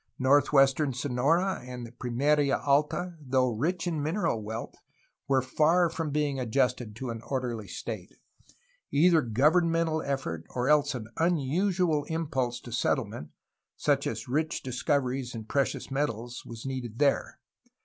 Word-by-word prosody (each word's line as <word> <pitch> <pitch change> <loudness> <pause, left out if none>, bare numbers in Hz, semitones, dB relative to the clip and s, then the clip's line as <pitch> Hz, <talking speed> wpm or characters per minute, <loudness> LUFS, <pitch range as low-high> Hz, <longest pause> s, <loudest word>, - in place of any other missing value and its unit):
Northeastern 135 +1 +4
Sonora 145 +9 +1
and 125 -2 -8
Pimeria 140 +3 +2
Alta, 150 +5 +1
though 130 -2 +1
rich 165 +11 -1
in 165 -4 -1
mineral 160 - 0
wealth, 110 +2 -5 0.5
were 135 -2 +3
far 160 +6 +3
from 165 -2 -3
being 145 -2 0
adjusted 125 -2 0
to 125 +1 -4
an 115 -1 -6
orderly 120 -5 -3
state; 95 +1 -6 0.8
either 165 +2 +5
governmental 160 +6 +2
effort 135 - -3
or 125 0 -2
else 145 -2 +3
an 110 -3 -6
un 170 +1 +3
usual 165 +1 +1
impulse 140 -7 -2
to 120 - -10
settlement, 75 -9 -1 0.5
such - - +1
as - - -4
rich 155 +5 -1
discoveries 130 -1 -1
in 110 -1 -6
precious 140 +3 -1
metals, 120 -4 -2
was 115 0 -8
needed 125 -4 -5
there. 140 0 +1
135 Hz, 135 wpm, -28 LUFS, 125-155 Hz, 0.8 s, either